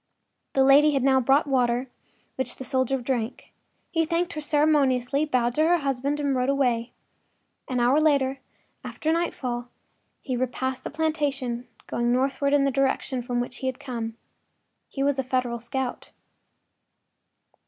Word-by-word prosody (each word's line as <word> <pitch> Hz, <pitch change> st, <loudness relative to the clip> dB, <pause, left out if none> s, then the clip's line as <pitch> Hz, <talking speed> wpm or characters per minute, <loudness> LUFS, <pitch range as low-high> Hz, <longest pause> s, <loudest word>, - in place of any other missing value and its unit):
” -, -, -52 dB
The 270 Hz, -, +5 dB
lady 290 Hz, +3 st, +6 dB
had 270 Hz, -2 st, +1 dB
now 265 Hz, -1 st, +4 dB
brought 270 Hz, +4 st, +4 dB
the 285 Hz, -, -7 dB
water, 245 Hz, 0 st, +1 dB, 0.5 s
which 260 Hz, -, -3 dB
the -, -, -8 dB
soldier 260 Hz, 0 st, 0 dB
drank. 245 Hz, -1 st, -3 dB, 0.4 s
He 325 Hz, -1 st, +2 dB
thanked 340 Hz, +3 st, -1 dB
her 305 Hz, -, -4 dB
ceremoniously, 290 Hz, -2 st, +2 dB
bowed 245 Hz, -5 st, +1 dB
to 305 Hz, -, +1 dB
her 350 Hz, +1 st, +4 dB
husband 280 Hz, 0 st, -1 dB
and 285 Hz, -2 st, 0 dB
rode 255 Hz, +1 st, +1 dB
away. 250 Hz, -4 st, +1 dB, 0.8 s
An 250 Hz, -1 st, 0 dB
hour 250 Hz, +5 st, +4 dB
later, 275 Hz, -3 st, +2 dB, 0.4 s
after 315 Hz, -, -2 dB
nightfall, 250 Hz, -8 st, -2 dB, 0.5 s
he 255 Hz, -, -2 dB
repassed 255 Hz, +1 st, -2 dB
the -, -, -2 dB
plantation, 285 Hz, -6 st, -2 dB, 0.2 s
going 240 Hz, 0 st, -1 dB
northward 270 Hz, +2 st, +1 dB
in 285 Hz, -1 st, +4 dB
the 275 Hz, -, +2 dB
direction 265 Hz, -1 st, 0 dB
from 245 Hz, 0 st, -2 dB
which 245 Hz, 0 st, -4 dB
he 265 Hz, -, -4 dB
had 260 Hz, -1 st, -3 dB
come. 230 Hz, -5 st, -5 dB, 0.7 s
He 275 Hz, -, -3 dB
was 280 Hz, -1 st, +1 dB
a -, -, +1 dB
Federal 250 Hz, -2 st, -1 dB
scout. 245 Hz, +2 st, -4 dB
265 Hz, 160 wpm, -25 LUFS, 245-285 Hz, 0.8 s, lady